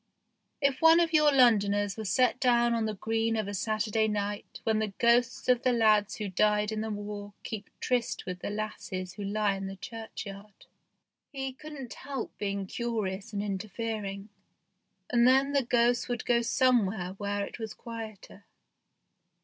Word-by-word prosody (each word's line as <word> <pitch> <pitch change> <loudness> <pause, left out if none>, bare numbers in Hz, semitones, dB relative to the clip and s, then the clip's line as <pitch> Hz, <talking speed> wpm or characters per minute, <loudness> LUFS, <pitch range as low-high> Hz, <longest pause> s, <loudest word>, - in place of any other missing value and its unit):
If 275 -2 +1
one 325 +1 +7
of 335 -1 +1
your 300 -1 +6
Londoners 205 -6 +4
were 220 - -6
set 250 +4 +2
down 240 -2 +3
on 230 -1 0
the 215 - -3
green 225 +2 0
of 215 -2 -1
a 205 - -4
Saturday 215 +2 0
night 205 -1 -3
when 220 -1 +1
the 215 -2 -2
ghosts 235 -1 +2
of 250 -1 +4
the 255 - +2
lads 215 -3 +3
who 210 - -4
died 210 +2 +2
in 215 0 -2
the 220 - -3
war 205 -1 -6
keep 220 -3 -6
tryst 245 -2 -1
with 180 -1 -5
the - - -4
lasses 205 -3 -4
who 205 - -7
lie 205 0 +1
in 195 0 -5
the 195 - -6
church 225 +3 -7
yard, 200 +1 -11 0.7
he 270 -1 -4
couldn't 275 -3 -9
help 270 -4 -6
being 200 -1 -2
curious 205 -3 -3
and 205 -1 -2
interfering, 205 0 -4 0.8
and 240 0 +5
then 270 +2 +4
the 280 - +4
ghosts 240 0 +2
would 240 -3 -3
go 235 -1 +3
somewhere 230 -7 +2
where 205 0 -1
it - - -10
was 220 -2 -5
quieter. 220 -3 -9
220 Hz, 170 wpm, -29 LUFS, 205-240 Hz, 0.8 s, one